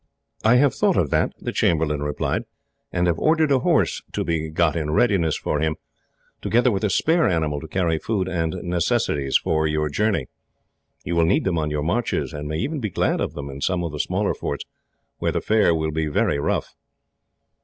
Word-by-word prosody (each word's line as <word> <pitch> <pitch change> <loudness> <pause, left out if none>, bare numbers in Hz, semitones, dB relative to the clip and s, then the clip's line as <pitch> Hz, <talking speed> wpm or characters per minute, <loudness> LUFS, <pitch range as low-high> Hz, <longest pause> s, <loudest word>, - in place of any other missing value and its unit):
"I 115 +3 +5
have 135 +2 +4
thought - - +2
of - - +1
that," - - +2
the - - -4
chamberlain 75 -3 +1
replied, 75 0 -2 0.5
"and 90 0 +1
have 85 -2 +1
ordered 155 -1 +3
a 135 - +4
horse - - +1
to - - -1
be 80 -1 -2
got 80 +1 +1
in 80 -2 -2
readiness 85 -2 +2
for 75 - -2
him, 80 0 0 0.7
together 120 +2 +2
with 100 0 -2
a 105 - +2
spare 165 - +2
animal 80 -4 0
to 80 - -8
carry 85 -1 0
food 100 -2 -1
and 85 -2 -1
necessaries 85 -5 +1
for 80 0 0
your 75 0 0
journey. 100 -2 0 0.8
You 85 - -2
will 85 -1 +4
need 85 - +2
them 90 -4 0
on 75 -1 -1
your 75 -1 -2
marches, 100 -2 -1
and 75 0 -5
may 75 +1 -3
even 145 - -2
be 110 -5 -2
glad - - 0
of - - -2
them 70 -1 -5
in 70 +1 -9
some 90 +1 0
of 85 - -3
the 75 - -6
smaller - - 0
forts, - - -4 0.5
where - - 0
the - - 0
fare 105 -6 +3
will 80 -1 -1
be 80 0 -1
very 70 -1 +1
rough." - - -1
80 Hz, 205 wpm, -23 LUFS, 75-100 Hz, 0.8 s, I